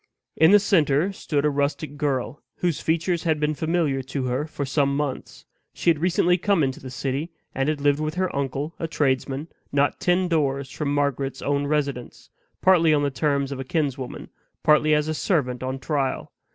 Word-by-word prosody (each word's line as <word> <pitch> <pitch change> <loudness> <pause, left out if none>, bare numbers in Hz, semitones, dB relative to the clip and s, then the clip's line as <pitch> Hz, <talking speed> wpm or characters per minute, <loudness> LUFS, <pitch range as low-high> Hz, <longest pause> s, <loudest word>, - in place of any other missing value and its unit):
In 160 +1 +6
the 205 - +8
center 180 -3 +2
stood 150 -6 -1
a 150 - +3
rustic 145 +1 -2
girl, 145 -1 -2
whose 175 -4 -1
features 165 +1 0
had 160 -3 0
been 150 0 +1
familiar 155 -2 0
to 135 +1 -4
her 130 +4 -1
for 145 -2 -4
some 140 0 +1
months. 145 -3 -4 0.3
She 170 - +3
had 155 - -1
recently 180 +1 +2
come 195 -4 +2
into 130 -1 -1
the 130 - -8
city, 135 +5 -3 0.2
and 135 +2 0
had 150 -2 -2
lived 145 0 +3
with 155 +1 -2
her 185 -3 -1
uncle, 140 +3 -2
a 165 - -2
tradesman, 140 -1 -1 0.2
not 140 0 +1
ten 180 +1 +2
doors 140 -5 0
from 145 -2 -2
Margaret's 140 -2 -1
own 145 0 0
residence, 140 -5 -3 0.3
partly 170 -4 +5
on 145 - +1
the 140 - 0
terms 140 +1 0
of 135 - -5
a - - -3
kinswoman, 135 -3 -3 0.3
partly 150 0 +4
as 150 0 0
a 155 - -1
servant 140 -7 0
on 130 +1 -3
trial. 135 -1 -2
145 Hz, 190 wpm, -24 LUFS, 135-160 Hz, 0.3 s, the